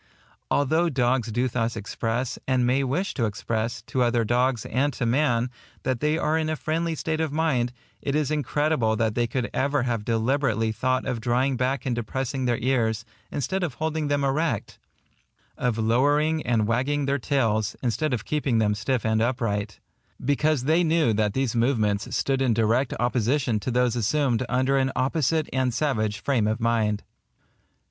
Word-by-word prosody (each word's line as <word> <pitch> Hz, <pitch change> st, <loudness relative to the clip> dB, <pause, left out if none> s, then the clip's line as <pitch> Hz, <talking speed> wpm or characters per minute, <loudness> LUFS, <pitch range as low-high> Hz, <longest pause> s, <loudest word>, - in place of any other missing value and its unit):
Although 160 Hz, +5 st, +2 dB
dogs 125 Hz, -4 st, +1 dB
do 120 Hz, +4 st, +1 dB
thus 115 Hz, -1 st, -1 dB
express, 115 Hz, +4 st, -3 dB
and 130 Hz, -1 st, +2 dB
may 130 Hz, +3 st, +2 dB
wish 165 Hz, +10 st, -1 dB
to 120 Hz, -, 0 dB
express, 110 Hz, +2 st, -3 dB
to 125 Hz, +2 st, -2 dB
other 120 Hz, -1 st, +2 dB
dogs 120 Hz, +1 st, +1 dB
and 140 Hz, +5 st, 0 dB
to 120 Hz, -, -2 dB
man, 125 Hz, -1 st, +1 dB, 0.3 s
that 130 Hz, -2 st, -1 dB
they 150 Hz, +1 st, +1 dB
are 160 Hz, -1 st, +1 dB
in 155 Hz, -1 st, -1 dB
a 155 Hz, -, 0 dB
friendly 165 Hz, +2 st, -1 dB
state 155 Hz, +1 st, -2 dB
of 160 Hz, -3 st, -1 dB
mind, 145 Hz, -6 st, +1 dB, 0.3 s
it 140 Hz, -, -1 dB
is 150 Hz, -1 st, 0 dB
incredible 145 Hz, -5 st, +1 dB
that 110 Hz, -1 st, 0 dB
they 120 Hz, +1 st, +1 dB
could 120 Hz, +1 st, -2 dB
ever 140 Hz, 0 st, +1 dB
have 115 Hz, -4 st, -1 dB
deliberately 115 Hz, -1 st, +1 dB
thought 130 Hz, +3 st, 0 dB
of 125 Hz, -4 st, -2 dB
drawing 125 Hz, +3 st, +1 dB
back 130 Hz, +3 st, -1 dB
and 125 Hz, -3 st, 0 dB
depressing 130 Hz, +3 st, -3 dB
their 120 Hz, -1 st, +1 dB
ears, 115 Hz, -3 st, 0 dB, 0.2 s
instead 165 Hz, +8 st, -2 dB
of 165 Hz, -8 st, -2 dB
holding 160 Hz, -1 st, -2 dB
them 145 Hz, -1 st, +1 dB
erect,—of 135 Hz, -3 st, -4 dB
lowering 145 Hz, +8 st, +2 dB
and 115 Hz, -3 st, +2 dB
wagging 135 Hz, +6 st, 0 dB
their 140 Hz, +1 st, 0 dB
tails, 110 Hz, -6 st, 0 dB
instead 135 Hz, +5 st, 0 dB
of 115 Hz, -3 st, -2 dB
keeping 140 Hz, -6 st, 0 dB
them 105 Hz, -2 st, +2 dB
stiff 110 Hz, +3 st, -1 dB
and 110 Hz, 0 st, +2 dB
upright, 115 Hz, -4 st, -1 dB
&c., -, -, -25 dB, 0.5 s
because 145 Hz, 0 st, +2 dB
they 160 Hz, +5 st, +3 dB
knew 160 Hz, -7 st, +2 dB
that 105 Hz, -1 st, 0 dB
these 130 Hz, -3 st, 0 dB
movements 115 Hz, -4 st, +1 dB
stood 135 Hz, -1 st, 0 dB
in 125 Hz, -4 st, +2 dB
direct 115 Hz, +3 st, +2 dB
opposition 120 Hz, 0 st, +1 dB
to 115 Hz, -, -4 dB
those 125 Hz, -1 st, +2 dB
assumed 125 Hz, +1 st, +1 dB
under 130 Hz, +2 st, +2 dB
an 135 Hz, 0 st, +1 dB
opposite 155 Hz, +3 st, +1 dB
and 130 Hz, -2 st, 0 dB
savage 110 Hz, -8 st, 0 dB
frame 120 Hz, -7 st, +1 dB
of 110 Hz, +2 st, -1 dB
mind. 110 Hz, -3 st, +1 dB
125 Hz, 175 wpm, -25 LUFS, 115-145 Hz, 0.5 s, they